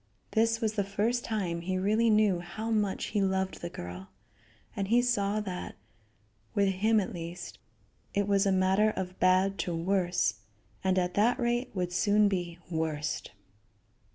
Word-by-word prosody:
This 225 +1 +2
was 220 -1 0
the 205 -2 0
first 215 +5 0
time 185 -7 -2
he 185 +2 -2
really 215 +5 +2
knew 210 -4 +4
how 215 +6 -5
much 210 -3 0
he 205 - +2
loved 190 0 -1
the 170 - -4
girl, 90 - -8 0.7
and 195 -3 -2
he 235 +4 +4
saw 215 -4 +1
that, 185 -3 -5 0.8
with 200 -1 +3
him 215 +4 +2
at 195 - -3
least, 175 0 -7 0.6
it 200 0 +1
was 200 0 +3
a - - +3
matter 190 +3 +3
of 185 -3 -5
bad 185 +2 +3
to 175 - -1
worse; 180 +1 +1 0.4
and 190 0 +2
at 180 -1 +1
that 230 +5 +3
rate 240 0 0
would 180 -1 -2
soon 205 +3 +4
be 175 -3 -2
worst. 160 -3 -2
195 Hz, 160 wpm, -29 LUFS, 180-215 Hz, 0.8 s, knew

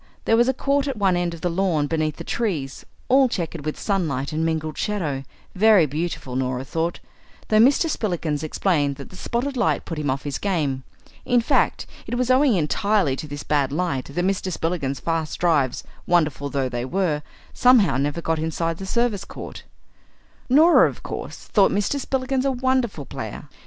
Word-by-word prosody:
There 225 - +4
was 240 +2 +4
a - - +2
court 280 +1 +1
at 270 -4 -3
one 195 -3 +2
end 175 -1 -1
of 165 - -13
the 175 - 0
lawn 170 -4 +1
beneath 155 0 -1
the - - -7
trees, 165 - -2 0.2
all 265 0 +5
chequered 170 -6 -4
with 155 - -3
sunlight 155 -8 -1
and 160 +1 0
mingled 160 -1 -1
shadow; 160 -11 -2 0.3
very 205 -3 +5
beautiful, 150 -3 -4
Norah 130 0 -1
thought, 165 +4 -2 0.5
though 215 - +4
Mr. 270 +8 +5
Spillikins 170 - -2
explained 155 -3 0
that 140 - -10
the - - -12
spotted 245 +8 -2
light 245 - +1
put 165 -3 -5
him 145 -2 -1
off 135 +1 -1
his 145 -2 -3
game. 150 -9 -1 0.4
In 245 - +3
fact, 230 - +1 0.2
it - - -2
was 250 +1 +1
owing 260 -2 +4
entirely 185 -1 +1
to 150 - -7
this 145 0 -6
bad 145 -3 +1
light 155 -4 -1
that 175 +6 -2
Mr. 190 -1 -1
Spillikins's 160 -6 -2
fast 165 +1 -2
drives, 150 -8 +1 0.2
wonderful 155 -5 +1
though 135 -2 -1
they 120 -1 -3
were, 155 +1 0 0.3
somehow 245 - +5
never 145 +4 -1
got 165 -1 0
inside 160 +1 -2
the 190 - -6
service 230 -2 0
court. - - -9 0.8
Norah, 315 +7 +6
of - - -11
course, - - -6
thought 200 -3 +3
Mr. 205 +8 0
Spillikins 265 -1 -1
a 275 - +1
wonderful 255 - 0
player. - - -7
170 Hz, 185 wpm, -23 LUFS, 145-220 Hz, 0.8 s, Norah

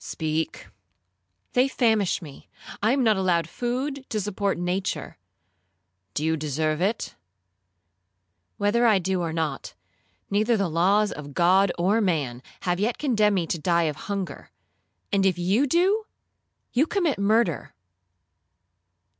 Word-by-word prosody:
'—'Speak.'—'They 95 - -4
famish 220 -9 +1
me,—I 160 - -5
am 270 0 +2
not 220 -3 +3
allowed 175 -4 +1
food 260 - -3
to 215 - -1
support 200 -1 -1
nature.'—'Do 95 - -6
you 160 0 +2
deserve 155 +1 -1
it?'—'Whether 95 - -4
I 215 -3 +5
do 185 0 -1
or 165 -2 -2
not, 160 - -3 0.6
neither 215 +3 +2
the 195 -3 0
laws 200 +6 +3
of 145 -2 -8
God 185 +2 +4
or 195 +6 +2
man 145 - -1 0.2
have 175 0 -1
yet 225 +4 0
condemned 215 -8 +2
me 175 -3 0
to 165 - -3
die 170 +1 +2
of 155 -2 -1
hunger; 200 -3 -4 0.6
and 195 -1 +3
if 190 -2 +2
you 195 +11 +2
do, 380 +9 +2 0.7
you 280 +6 +3
commit 340 - 0
murder.' 200 -5 +1
175 Hz, 120 wpm, -25 LUFS, -, 0.7 s, I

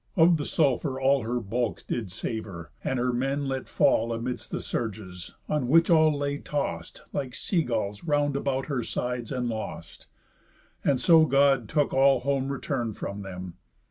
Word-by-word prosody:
Of 165 0 +6
the 145 - -4
sulphur 135 -2 +1
all 135 0 +3
Her 120 +2 -1
bulk 115 -2 -2
did 110 -5 -3
savour; 95 -4 -5
and 130 - -1
her 125 0 0
men 135 +3 -1
let 135 -1 -3
fall 115 +1 +3
Amids 120 +2 -4
the - - -3
surges, 95 -5 -5
on 150 -5 0
which 165 +5 +5
all 155 -2 +5
lay 145 0 -2
tost, 145 - -4
Like 130 -3 -3
sea 180 -4 0
gulls, 110 -6 -2
round 145 -3 +1
about 135 -1 -1
her 135 -5 -2
sides, 125 0 -3
and 125 -2 -1
lost. 110 -7 -6 0.8
And 135 -3 +2
so 165 -2 +6
God 135 -5 +3
took 150 -2 +1
all 135 0 +4
home 135 0 0
return 120 -5 -2
from 100 +1 -5
them. 90 -2 -8
130 Hz, 170 wpm, -27 LUFS, 115-140 Hz, 0.8 s, Of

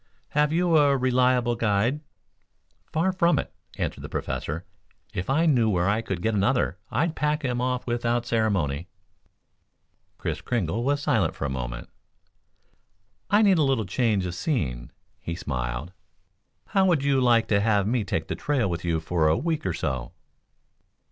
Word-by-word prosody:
"Have 150 0 +2
you 170 0 +3
a 140 -2 +4
reliable 125 -1 +2
guide?" 115 +5 +1 0.9
"Far 170 +4 +1
from 175 -2 +2
it," - - -3 0.2
answered - - -3
the - - -7
Professor. 80 +5 -4 0.5
"If 90 - -4
I 155 +5 +3
knew 125 -8 +3
where 90 -3 +1
I 105 +3 +2
could 95 -6 -4
get 115 - +1
another, 105 -2 +1
I'd 165 +1 0
pack 150 -1 0
him 125 -1 -1
off 125 0 -1
without 120 0 0
ceremony." 95 -10 0 1.3
Kris - - -3
Kringle 115 -2 -1
was 145 +2 0
silent - - +1
for - - -4
a 70 - -2
moment. - - -5 1.4
"I 210 +2 +5
need 195 -5 +5
a - - +4
little 135 -6 +1
change 105 -1 +1
of 90 - -3
scene," 75 - -2 0.3
he 85 -4 -5
smiled. 65 +1 -4 0.8
"How 195 -2 +3
would 165 -6 +2
you 140 -2 +2
like 120 -2 +4
to 100 -1 +3
have 105 -2 +2
me 115 +1 +1
take 80 -4 -2
the - - -2
trail 130 - 0
with 85 -2 -3
you 85 -2 0
for 80 0 +1
a 80 - +3
week 155 - -1
or 90 - 0
so?" 65 -5 -3
115 Hz, 165 wpm, -25 LUFS, 90-140 Hz, 1.4 s, I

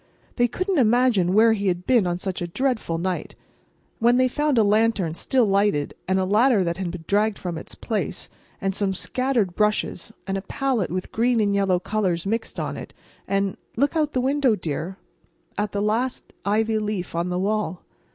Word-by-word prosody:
They 240 -1 +4
couldn't 370 - -1
imagine 235 -6 +3
where 220 +3 +5
he 200 -2 -1
had 180 -1 -1
been 235 -8 +3
on 175 0 -1
such 185 0 -4
a 175 - -2
dreadful 220 -4 -1
night. 180 +2 -3 0.6
And 230 - +2
then 245 +1 +5
they 255 0 +4
found 295 +1 0
a 225 - +6
lantern, 210 -5 +2
still 245 +8 +2
lighted, 200 -7 +1
and 190 +1 +2
a 190 - +1
ladder 215 +2 +4
that 170 -1 -2
had 190 -2 -3
been 170 -2 -8
dragged 210 +1 +2
from 175 -2 -4
its 160 - -8
place, 220 -3 -3 0.3
and 195 -1 -1
some 195 -1 -1
scattered 245 -3 0
brushes, 210 -2 0
and 195 0 -2
a - - -8
palette 245 0 -1
with 185 +1 -4
green 235 +1 +2
and 205 -2 +2
yellow 195 -2 +2
colors 185 -3 -1
mixed 225 +3 -2
on - - -3
it, - - -9 0.3
and—look 200 - -1
out 300 -2 +1
the 255 - +1
window, 270 -3 +2
dear, 170 +1 -4 0.6
at 210 0 -1
the 200 0 -1
last 230 +5 -1
ivy 220 +2 +1
leaf 210 -4 -3
on 170 +1 -1
the 180 - -1
wall. 190 -3 -1
205 Hz, 190 wpm, -24 LUFS, 185-235 Hz, 0.6 s, a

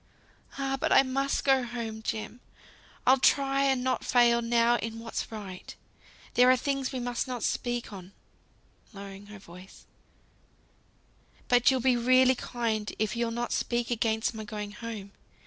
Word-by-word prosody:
"Ah! 270 0 -1
but - - 0
I 270 - +7
must 275 +1 -1
go 270 -1 +4
home, 230 -2 -5
Jem. 220 +2 -4 0.7
I'll 260 +1 +5
try 275 +1 +3
and 265 -2 +1
not 260 0 -1
fail 240 -1 +4
now 235 0 +3
in 225 -1 -5
what's 230 0 -5
right. 200 -4 -8 0.6
There 250 +1 +5
are 255 - +5
things 275 0 -2
we 260 - -4
must 245 +1 -2
not 250 -2 -4
speak 240 -2 -2
on" 185 -1 -10 0.8
(lowering 200 0 -10
her 210 0 -11
voice), 180 0 -14 1.6
"but 245 -1 +4
you'll 260 -2 +1
be 255 0 +3
really 255 +2 +5
kind 230 -4 -3
if 215 +2 -1
you'll 235 0 -1
not 240 +1 -3
speak 240 0 -1
against 220 0 0
my 220 -1 -6
going 210 -2 -6
home. 210 -2 -8
240 Hz, 155 wpm, -28 LUFS, 220-255 Hz, 1.6 s, I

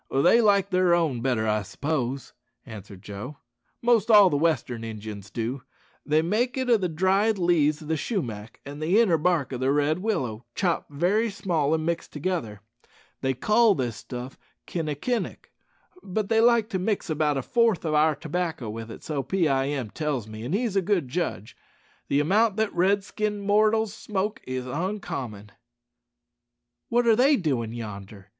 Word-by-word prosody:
"They 140 - +4
like 200 -2 +3
their 180 -1 +4
own 155 -9 0
better, 120 -4 0
I 105 0 +1
s'pose," 135 +3 -3 0.3
answered 100 -3 -11
Joe; 105 +8 -7 0.5
"most 235 -3 +3
all 205 -4 +7
the - - +1
western 140 -7 0
Injuns 105 -2 -7
do. 120 +5 -3 0.4
They 155 +1 +2
make 230 +9 0
it 260 -1 0
o' 230 - +6
the 185 -3 -2
dried 190 +6 +2
leaves 160 -4 +2
o' - - -10
the 160 +1 0
shumack 115 - -4
and 145 +2 -8
the 175 +8 +3
inner 180 -9 +3
bark 155 -5 +1
o' - - -2
the 130 +1 +1
red 150 +3 +1
willow, 135 - -2
chopped 180 -4 -1
very 190 +10 +1
small 175 -7 -1
an' 155 0 -2
mixed 170 0 -2
together. 150 - -3 0.6
They 130 -1 0
call 215 - +4
this 120 -6 -2
stuff 125 +2 -8 0.3
kinnekinnik; 165 - -3 0.5
but 195 +2 -3
they 225 -1 +4
like 235 -2 +4
to 190 - -2
mix 200 +2 -1
about 150 -3 0
a 135 - -2
fourth 230 - +2
o' 155 - 0
our 155 0 +4
tobacco 160 -7 -3
with 115 +1 -7
it, - - -10
so 150 -3 -2
Pee 180 +3 0
eye 135 -1 +1
em 135 -7 -3
tells 145 -8 -2
me, 110 0 -8
an' 130 +8 -3
he's 220 -1 0
a 195 - +3
good 180 -8 0
judge. 125 - -3 0.5
The 140 - +2
amount 205 +7 +2
that 220 -1 0
red 195 +3 +2
skinned 210 0 -3
mortal 215 +2 +3
smokes 210 0 -4
is 130 -1 -3
oncommon." 135 - -4 1.4
"What 240 +1 +2
are 230 -1 +5
they 270 +5 +5
doin' 130 - -1
yonder?" 100 -3 -8
160 Hz, 175 wpm, -26 LUFS, 130-200 Hz, 1.4 s, all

